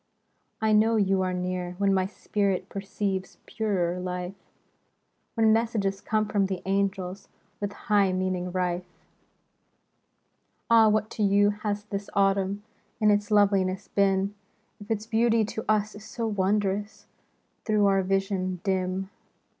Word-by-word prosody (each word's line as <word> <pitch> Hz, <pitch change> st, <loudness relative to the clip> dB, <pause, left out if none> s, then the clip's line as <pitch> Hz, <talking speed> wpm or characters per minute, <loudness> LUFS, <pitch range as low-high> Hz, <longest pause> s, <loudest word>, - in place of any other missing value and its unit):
I 220 Hz, 0 st, +2 dB
know 220 Hz, +2 st, +4 dB
you 195 Hz, -2 st, +2 dB
are 185 Hz, 0 st, 0 dB
near, 180 Hz, 0 st, -3 dB
when 200 Hz, 0 st, +2 dB
my 190 Hz, -1 st, +1 dB
spirit 200 Hz, -2 st, -1 dB
Perceives 195 Hz, -1 st, -3 dB
purer 185 Hz, -5 st, -1 dB
life; 180 Hz, 0 st, -4 dB, 1.0 s
When 220 Hz, -1 st, +4 dB
messages 215 Hz, -4 st, 0 dB
come 215 Hz, 0 st, 0 dB
from 200 Hz, -2 st, +1 dB
the 190 Hz, -2 st, -4 dB
angels 195 Hz, -1 st, -1 dB, 0.3 s
With 205 Hz, -1 st, -3 dB
high 205 Hz, -3 st, +2 dB
meaning 185 Hz, -1 st, -1 dB
rife. 180 Hz, -1 st, -1 dB, 1.8 s
Ah, 225 Hz, -1 st, +7 dB
what 215 Hz, 0 st, 0 dB
to -, -, -5 dB
you 205 Hz, 0 st, +4 dB
has 205 Hz, 0 st, -3 dB
this 200 Hz, -1 st, -5 dB
Autumn 195 Hz, 0 st, +1 dB, 0.4 s
In 210 Hz, -2 st, +4 dB
its 205 Hz, 0 st, +1 dB
loveliness 195 Hz, -2 st, +2 dB
been. 195 Hz, 0 st, +1 dB, 0.5 s
If 205 Hz, +1 st, -12 dB
its 220 Hz, -1 st, -1 dB
beauty 225 Hz, 0 st, +2 dB
to 220 Hz, +1 st, -5 dB
us 215 Hz, 0 st, +2 dB
is 205 Hz, -, -11 dB
so 230 Hz, +1 st, -4 dB
wondrous 205 Hz, 0 st, -1 dB, 0.6 s
Through 215 Hz, -2 st, +2 dB
our 195 Hz, -1 st, +3 dB
vision 190 Hz, -1 st, -1 dB
dim? 190 Hz, 0 st, -1 dB
200 Hz, 135 wpm, -27 LUFS, 190-210 Hz, 1.8 s, Ah